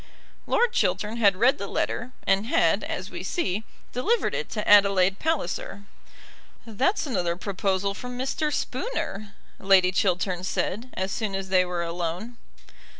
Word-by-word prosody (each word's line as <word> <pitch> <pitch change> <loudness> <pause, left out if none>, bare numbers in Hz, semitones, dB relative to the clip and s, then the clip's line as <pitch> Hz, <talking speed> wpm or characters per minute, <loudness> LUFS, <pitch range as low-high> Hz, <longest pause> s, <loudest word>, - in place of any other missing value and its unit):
Lord 480 -1 +2
Chiltern 215 - 0
had 200 -4 +4
read 240 +7 +3
the 200 - -4
letter, 245 +5 -2
and 195 +3 +2
had, 330 +6 +2
as - - -5
we - - -6
see, 215 - -2 0.3
delivered 440 - +1
it 480 - -3
to 210 - -4
Adelaide 195 -2 +5
Palliser. 205 - -2 0.8
"That's 260 - 0
another 175 - -1
proposal 195 +1 -1
from 250 +4 -7
Mr. 300 +4 -1
Spooner," 215 - -3 0.2
Lady 190 -2 +5
Chiltern 185 -1 0
said, 215 +5 -2
as 190 +1 -2
soon 210 -3 -2
as 195 -1 -4
they 185 -1 +4
were 175 -1 -2
alone. 175 +7 -4
200 Hz, 145 wpm, -26 LUFS, 185-245 Hz, 0.8 s, Adelaide